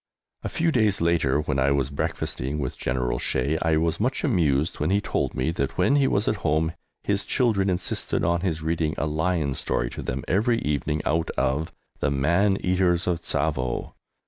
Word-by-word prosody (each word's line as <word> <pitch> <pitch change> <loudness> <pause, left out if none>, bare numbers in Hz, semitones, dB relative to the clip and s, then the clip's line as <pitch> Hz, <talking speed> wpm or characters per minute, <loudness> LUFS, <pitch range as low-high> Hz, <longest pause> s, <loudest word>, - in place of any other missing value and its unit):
A - - -2
few 165 0 +1
days 110 -7 +2
later, 80 -4 +2
when 70 -3 -1
I 65 +1 +3
was 70 -1 +1
breakfasting 70 0 -3
with 65 -4 -3
General - - -1
Shea, 70 +5 0
I 80 -1 +2
was 80 +1 0
much 125 +5 0
amused 80 - +1
when 75 - 0
he 100 +2 +3
told 105 - -2
me 65 +5 0
that 70 -4 -3
when 140 - +3
he 140 -2 +3
was 100 -2 +1
at 110 - +1
home 80 -1 0 0.3
his 100 -1 0
children 105 -7 +1
insisted 90 -1 -1
on 85 +1 +1
his 80 -4 -2
reading 80 -1 0
a - - 0
lion 75 -1 0
story - - -1
to - - -6
them 65 +1 -3
every 115 +6 +2
evening 75 +1 -1
out 80 +1 0
of 70 +5 0 0.3
"The - - +1
Man 85 +9 +2
Eaters 90 -2 +2
of 85 -2 0
Tsavo"! 65 -8 -1
80 Hz, 190 wpm, -25 LUFS, 70-95 Hz, 0.3 s, I